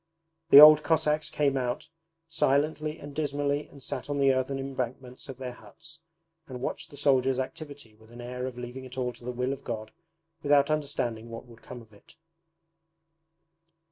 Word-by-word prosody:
The 140 - +10
old 150 0 +10
Cossacks 155 -1 +1
came 140 -2 +1
out 125 -2 -2 0.4
silently 155 0 0
and 145 -2 -10
dismally 145 -1 -1
and 140 -2 -15
sat - - -5
on 145 - -1
the 135 -1 +4
earthen 130 +1 -1
embankments 130 -1 -6
of 130 - -7
their 130 -1 -5
huts, 125 +8 -14 0.5
and 125 -2 -7
watched 125 - -4
the 145 - -12
soldiers' 135 -2 +2
activity 140 -2 -7
with 110 +1 -21
an 120 +1 -13
air 125 +1 -5
of 125 -2 -8
leaving 125 +2 -7
it 130 0 -11
all 125 -1 -2
to - - -17
the 125 - -4
will 125 +2 -2
of 135 - -9
God 110 -2 -5 0.5
without 145 0 +3
understanding 120 -6 -2
what 115 +1 -8
would 115 -2 -17
come 125 -2 -10
of 110 -1 -23
it. 100 - -20
130 Hz, 175 wpm, -28 LUFS, 125-145 Hz, 0.5 s, The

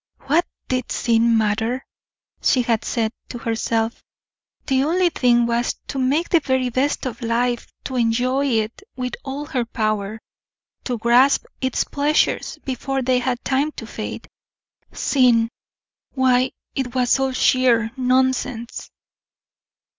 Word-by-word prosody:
"What 315 +6 +2 0.2
did 255 -1 -2
sin 230 -1 +3
matter?" 225 +4 0 0.6
she 255 - +3
had 230 -2 0
said, 225 -3 0 0.2
to 245 - -6
herself; 225 0 -1 0.6
"the 265 0 +2
only 350 +4 +2
thing 240 -4 +3
was 235 +1 0
to 275 - -3
make 280 +6 +1
the 335 - +5
very 260 -3 0
best 270 +4 0
of 235 -2 -5
life, 240 +1 0 0.2
to 260 - -5
enjoy 250 +4 +1
it 225 - -1
with 250 -1 -4
all 280 +2 -5
her 255 -4 -1
power, 215 -2 -2 0.7
to 245 -2 -1
grasp 240 +5 +4 0.2
its 260 -1 +1
pleasures 290 +2 0
before 270 +1 -2
they 250 0 +2
had 245 -1 -2
time 280 +3 +1
to - - -8
fade." - - -6 0.6
Sin! 240 -4 +3 0.7
why 255 -1 +3 0.2
it 260 -2 -3
was 250 +1 +3
all 265 0 +1
sheer 250 -3 +3
nonsense. 255 -2 0
250 Hz, 130 wpm, -21 LUFS, 230-265 Hz, 0.7 s, the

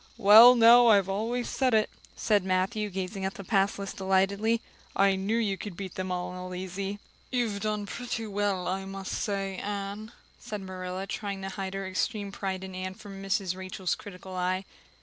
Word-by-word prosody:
"Well 225 +3 +9
now, 235 +1 +8
I 210 -3 +7
always 220 +6 -2
said 255 -4 +1
it," 215 -1 +3 0.3
said 210 -3 +2
Matthew, 190 +3 0
gazing 190 +1 -4
at 190 0 -2
the 200 - -7
pass 195 -1 +1
list 200 -1 -6
delightedly. 195 +4 +2 0.4
"I 195 0 +4
knew 195 +4 0
you 205 -4 0
could 200 -5 -7
beat 190 -3 -6
them 185 0 -4
all 180 0 -4
easy." 195 +2 -4 0.3
"You've 230 -6 -1
done 210 -1 -1
pretty 230 +1 -4
well, 200 -3 -1
I 190 +1 -2
must 195 0 -6
say, 195 -2 -2
Anne," 205 +2 -5 0.3
said 210 -2 -6
Marilla, 185 0 -5
trying 200 -1 -4
to 195 - -3
hide 195 0 -5
her 195 0 -3
extreme 200 +2 -2
pride 190 -1 -4
in 190 0 -7
Anne 185 0 -5
from 200 -2 -10
Mrs. 195 -2 -1
Rachel's 185 -1 -3
critical 185 -1 -9
eye. 185 +1 -1
195 Hz, 180 wpm, -28 LUFS, 190-210 Hz, 0.4 s, Well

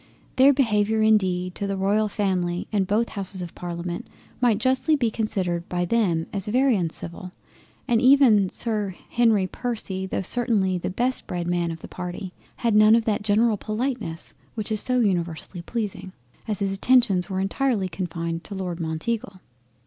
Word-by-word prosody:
Their 265 +2 +7
Behaviour 220 -5 +2
indeed 185 -4 +2
to 200 - -2
the 195 0 -2
Royal 205 +3 +2
Family 185 -4 -1
and 200 -3 +1
both 220 +4 +1
Houses 195 -2 -4
of 170 - -8
Parliament 175 0 -5 0.3
might 240 -4 +4
justly 260 +6 +2
be 240 -6 0
considered 185 -6 -2
by 175 0 0
them 175 -6 +1
as 200 -1 -2
very 255 +3 +3
uncivil, 175 0 -5 0.5
and 235 -3 +3
even 250 -7 +6
Sir 210 -4 -3 0.2
Henry 225 -5 +3
Percy 190 -3 -4
tho' 190 - -2
certainly 200 -4 +1
the - - -3
best 245 +7 -1
bred 175 -1 -3
man 175 -1 0
of 165 -1 -7
the - - -7
party, 180 +1 -6 0.2
had 235 -3 0
none 215 +1 +7
of 230 -1 +1
that 210 -2 0
general 215 +1 +3
politeness 215 -6 -3 0.2
which 220 -1 -4
is 215 - +1
so 250 0 +1
universally 175 -3 -1
pleasing, 195 -2 -4 0.3
as 210 -2 -1
his 200 -2 -1
attentions 210 -3 +3
were 190 -1 -2
entirely 205 +1 0
confined 170 -2 -4
to 205 - -7
Lord 180 -3 -4
Mounteagle. 185 +5 -3
200 Hz, 165 wpm, -24 LUFS, 180-230 Hz, 0.5 s, Their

